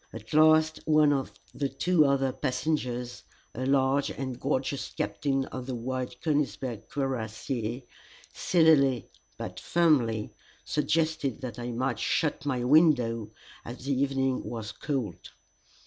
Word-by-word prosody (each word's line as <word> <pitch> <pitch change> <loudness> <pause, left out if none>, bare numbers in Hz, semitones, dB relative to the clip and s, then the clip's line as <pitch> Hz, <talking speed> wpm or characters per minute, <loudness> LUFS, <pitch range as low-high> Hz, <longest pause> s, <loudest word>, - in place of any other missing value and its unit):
At 110 +3 -10
last 155 0 +5
one 155 -2 +5
of 135 -2 -2 0.2
the 140 -1 -2
two 175 -1 +3
other 135 -1 +2
passengers, 125 -2 -2 0.3
a 130 +2 -3
large 135 0 +2
and 130 -2 -5
gorgeous 135 +1 -1
captain 135 +7 -1
of 130 -1 -7
the 130 - -3
White 125 +1 -4
Konigsberg 135 -7 -1
Cuirassiers, 120 -2 -3 0.5
civilly 150 -7 +3 0.3
but - - -6
firmly 130 -11 +2 0.3
suggested 155 -3 0
that 120 -3 -6
I 120 0 -4
might 125 +1 -1
shut 150 -2 0
my 125 -3 0
window, 125 -6 +3 0.3
as 125 +2 -9
the 140 - +1
evening 135 -1 0
was 110 -3 -5
cold. 130 - -4
135 Hz, 125 wpm, -28 LUFS, 120-145 Hz, 0.5 s, last